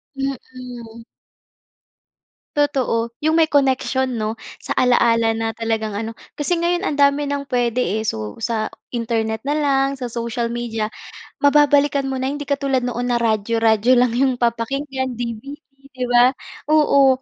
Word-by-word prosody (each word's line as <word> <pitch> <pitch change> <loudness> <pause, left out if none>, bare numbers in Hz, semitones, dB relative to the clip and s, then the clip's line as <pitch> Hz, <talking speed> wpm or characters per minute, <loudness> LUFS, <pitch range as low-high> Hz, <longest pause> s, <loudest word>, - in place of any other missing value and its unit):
Mm. 250 -4 -7 1.5
Totoo, 260 -5 +1 0.2
yung 315 - +3
may 320 -1 +4
connection, 265 -2 +1
'no? 220 -1 -3 0.2
Sa - - -4
ala-ala 230 -2 +3
na 225 0 -3
talagang 220 -2 -2
ano, 225 +1 -4 0.2
kasi 295 +4 0
ngayon 350 +1 0
ang - - 0
dami 280 +1 +4
ng 280 0 -3
puwede, 245 -1 +1
eh. 220 +3 -1
So, 110 - -3
sa 225 -1 -2 0.2
Internet 225 -2 -1
na 290 +2 -1
lang, 275 -2 +1
sa 255 - -5
social 235 0 -3
media, 230 -2 -2 0.5
mababalikan 285 -1 +3
mo 265 - -2
na, 260 - -2
hindi 285 +2 -3
katulad 275 -2 0
noon 245 0 -2
na 235 - +1
radyo-radyo 225 +1 +2
lang 250 -2 +2
yung 265 0 +3
papakinggan, 260 +3 -1
DVD 240 +5 -6 0.3
'di 255 -1 -3
ba? 245 +2 +5 0.4
Oo, 275 -3 +4
250 Hz, 145 wpm, -20 LUFS, 230-275 Hz, 1.5 s, ba